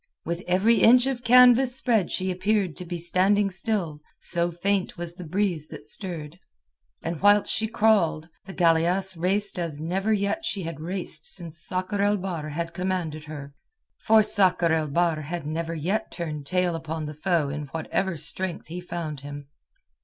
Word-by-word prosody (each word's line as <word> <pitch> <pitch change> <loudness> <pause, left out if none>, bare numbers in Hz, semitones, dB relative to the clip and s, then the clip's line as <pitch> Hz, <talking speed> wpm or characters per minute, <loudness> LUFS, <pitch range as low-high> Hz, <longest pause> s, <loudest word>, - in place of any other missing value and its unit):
With 170 +1 -3
every 195 +6 +3
inch 245 +2 +7
of 265 -2 -2
canvas 250 +1 +6
spread 230 -7 +2
yet - - -11
she 185 0 -1
appeared 190 -1 0
to 180 - -6
be 175 0 -4
standing 190 +4 +2
still, 180 -5 -2 0.2
so 170 0 -1
faint 185 +3 -1
was 170 0 -4
the 180 +1 -9
breeze 175 -2 -1
that - - -10
stirred. 175 -6 -5 0.6
And 165 -2 -4
whilst 205 +1 +5
she 220 - +1
crawled, 210 -8 +2 0.2
the 190 - -9
galeasse 175 +2 +2
raced 190 +3 0
as 165 -4 -4
never 190 +7 -1
yet 205 +9 0
she 195 - -2
had 165 -3 -6
raced 170 -2 -2
since 170 -3 -4
Sakr 185 +3 -1
el 205 +1 +2
Bahr 175 -5 -4
had 165 +3 -4
commanded 175 -5 -3
her, 145 -2 -8 0.5
for 220 0 +5
Sakr 185 -5 +3
el 160 -1 +1
Bahr 165 +1 +1
had 160 +1 -5
never 165 +2 -3
yet 180 +8 -1
turned 150 -5 -5
tail 180 0 +1
upon 160 -1 -4
the 150 - -6
foe 155 -1 0
in 145 +1 -5
whatever 165 +4 -2
strength 165 +3 -3
he 175 +2 -5
found 165 -4 -5
him. 145 0 -9
175 Hz, 175 wpm, -25 LUFS, 160-200 Hz, 0.6 s, inch